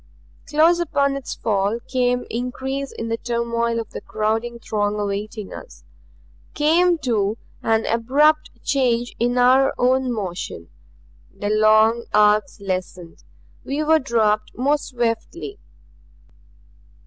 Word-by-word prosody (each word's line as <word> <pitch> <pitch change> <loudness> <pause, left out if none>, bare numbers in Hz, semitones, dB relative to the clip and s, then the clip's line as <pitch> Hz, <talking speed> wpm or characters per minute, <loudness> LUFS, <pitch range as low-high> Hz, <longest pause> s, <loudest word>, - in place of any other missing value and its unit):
Close 325 +3 +4
upon 280 -5 +1
its 275 -2 -5
fall 205 0 0
came 250 -1 0
increase 265 +3 -4
in 230 - -6
the 230 - -1
turmoil 235 0 -1
of 225 - -6
the - - -7
crowding 225 +2 -2
throng 210 -2 -2
awaiting 205 +1 -4
us. - - -11 0.7
Came, 335 +4 +3
too, 225 -7 0 0.2
an 225 0 +1
abrupt 290 +7 +2
change 245 -3 0
in 245 +2 +1
our 260 +2 +4
own 255 +1 +2
motion. 180 - -5 0.7
The 205 +1 -3
long 215 +2 +4
arcs 210 +4 +3
lessened. 185 -3 -5 0.4
We 290 +3 -2
were 315 +1 +4
dropped 215 -5 0
more 285 +4 +2
swiftly. 250 - -3
235 Hz, 115 wpm, -21 LUFS, 215-270 Hz, 0.7 s, Close